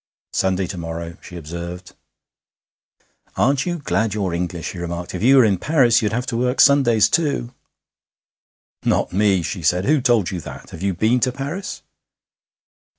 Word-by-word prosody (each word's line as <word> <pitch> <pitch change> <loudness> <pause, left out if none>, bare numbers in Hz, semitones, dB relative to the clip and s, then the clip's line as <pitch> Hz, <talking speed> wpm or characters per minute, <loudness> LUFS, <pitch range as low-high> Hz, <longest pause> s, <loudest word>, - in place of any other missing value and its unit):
'Sunday 95 0 0
to 90 +1 -6
morrow,' 85 0 -6
she 90 - -11
observed. 85 +3 -7 1.4
'Aren't 135 - +1
you 175 -1 -1
glad 115 - -1
you're 95 -5 -1
English?' 85 0 -3
he 90 - -8
remarked. 85 0 -5
'If 90 - -4
you 135 +5 +5
were 130 - +7
in 100 -4 +1
Paris 135 - +3
you'd 105 - 0
have 125 +2 -2
to 115 - -3
work 125 +2 0
Sundays 130 -6 +5
too.' 140 -7 -1 1.3
'Not - - 0
me!' 95 -2 +2
she 90 - -4
said. 90 +4 +1
'Who 150 -1 +3
told 120 -7 +2
you 90 -3 -4
that? - - -10
Have 80 - -9
you 95 -1 -1
been 115 +7 +2
to 130 +1 +1
Paris?' 140 +9 -6
105 Hz, 165 wpm, -21 LUFS, 90-125 Hz, 1.4 s, were